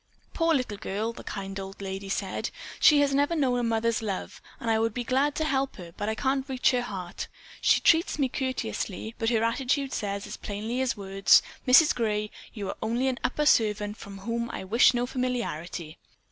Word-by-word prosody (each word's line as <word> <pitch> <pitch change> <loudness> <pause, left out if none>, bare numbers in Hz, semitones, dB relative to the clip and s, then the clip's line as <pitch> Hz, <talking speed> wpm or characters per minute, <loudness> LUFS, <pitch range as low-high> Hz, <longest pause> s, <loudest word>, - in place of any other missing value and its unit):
"Poor 330 -1 +2
little 240 -7 -2
girl," 215 +3 -2
the - - -10
kind 195 -1 -5
old 195 0 -8
lady 195 0 -5
said. - - -2 0.3
"She 295 -2 +7
has 280 -1 +2
never 285 +4 +2
known 260 -5 +2
a - - 0
mother's 230 0 +1
love 200 -4 -4 0.2
and 230 - -6
I 220 - +3
would 225 -1 0
be 245 - -2
glad 275 +4 +1
to 315 - 0
help 275 -3 0
her, 170 -3 -10
but 205 0 -2
I 220 - -1
can't 270 +2 -1
reach 260 -1 +3
her 250 -1 +1
heart. 190 -6 -5 0.3
She - - +4
treats 330 +2 +4
me 280 -3 +2
courteously, 240 -5 -3
but 225 - +1
her 225 -2 +2
attitude 265 +3 0
says 200 -1 -3
as - - -7
plainly 220 +5 -3
as 260 -4 0
words: 195 0 +4 0.2
'Mrs. 285 +5 +7
Gray, 210 -3 -1 0.2
you 205 -4 -5
are - - -5
only 235 +4 +1
an 255 - -3
upper 300 +4 0
servant 210 -5 +3
from 200 -2 -10
whom 235 +4 -3
I - - -5
wish 230 +6 +5
no 240 0 +1
familiarity. 230 - -3
230 Hz, 200 wpm, -27 LUFS, 205-260 Hz, 0.3 s, She